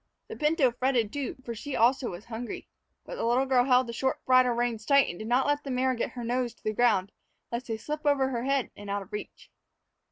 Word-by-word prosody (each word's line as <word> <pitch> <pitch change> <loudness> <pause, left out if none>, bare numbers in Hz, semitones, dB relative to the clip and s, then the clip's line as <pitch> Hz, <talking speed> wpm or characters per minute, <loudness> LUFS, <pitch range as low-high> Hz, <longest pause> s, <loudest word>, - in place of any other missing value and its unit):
The - - -6
pinto 300 -4 +2
fretted, 245 -3 0
too, 285 -3 -3
for 235 - -4
she 270 +5 -6
also 245 +2 +3
was 175 +4 -8
hungry. 235 0 -6 0.4
But - - -7
the - - -3
little 245 +3 +2
girl 255 -2 +3
held 255 -1 +4
the 235 - -6
short 265 +3 -2
bridle 255 -1 +5
reins 235 -2 -1
tight 280 +3 +4
and 175 - -6
did 215 - -6
not 250 +3 +2
let 290 0 0
the 275 - -6
mare 260 0 +1
get 235 - -3
her 245 - -6
nose 240 0 -1
to - - -31
the 215 - -1
ground 205 -4 +2 0.4
lest 235 +2 -4
they 225 -2 -2
slip 300 +7 -5
over 280 -3 +2
her 240 -2 -2
head 275 -2 0
and 205 0 -10
out 200 0 -2
of 195 - -20
reach. 210 - -8
245 Hz, 245 wpm, -28 LUFS, 230-265 Hz, 0.4 s, bridle